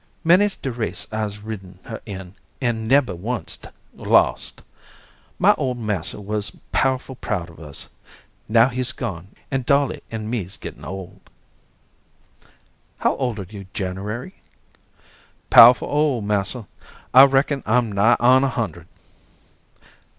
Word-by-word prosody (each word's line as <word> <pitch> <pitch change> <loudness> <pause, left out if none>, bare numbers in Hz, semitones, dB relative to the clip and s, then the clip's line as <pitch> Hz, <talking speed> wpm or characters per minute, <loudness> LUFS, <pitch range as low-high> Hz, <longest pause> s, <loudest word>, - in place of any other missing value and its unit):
Many's 185 +4 +4
de 135 - -4
race 115 -2 -3
I'se 105 -1 -3
ridden 95 -4 -8
her 110 - -7
in, 95 -3 -8 0.3
an' 115 -4 -1
nebber 130 -5 +3
onct 110 +7 -5 0.3
lost. - - +1 0.7
My - - +5
ole 130 -2 -1
massa 105 -7 -3
wuz 105 +1 -2 0.2
powerful 130 0 0
proud 90 -8 -4
of 85 - -17
us. 75 -3 -8 0.6
Now 115 +3 +5
he's 130 0 -1
gone, 95 -8 -5 0.2
an' 135 -1 0
Dolly 140 +2 +1
an' 110 -1 -5
me's 105 -5 -4
gettin' - - -9
old." 95 -1 -8 1.8
"How - - +1
old 125 -5 -2
are 95 -3 -6
you, 100 -1 -10
January?" 105 - -5 1.1
"Powerful 120 +2 +9
ole, 145 -5 +1
massa. 105 +2 -1 0.5
I 130 +2 +10
reckon 135 +1 +1
I'm 115 0 +2
nigh 100 +4 +4
on 130 +2 +5
a 135 - +2
hundred." 95 - -4
110 Hz, 130 wpm, -22 LUFS, 100-130 Hz, 1.8 s, I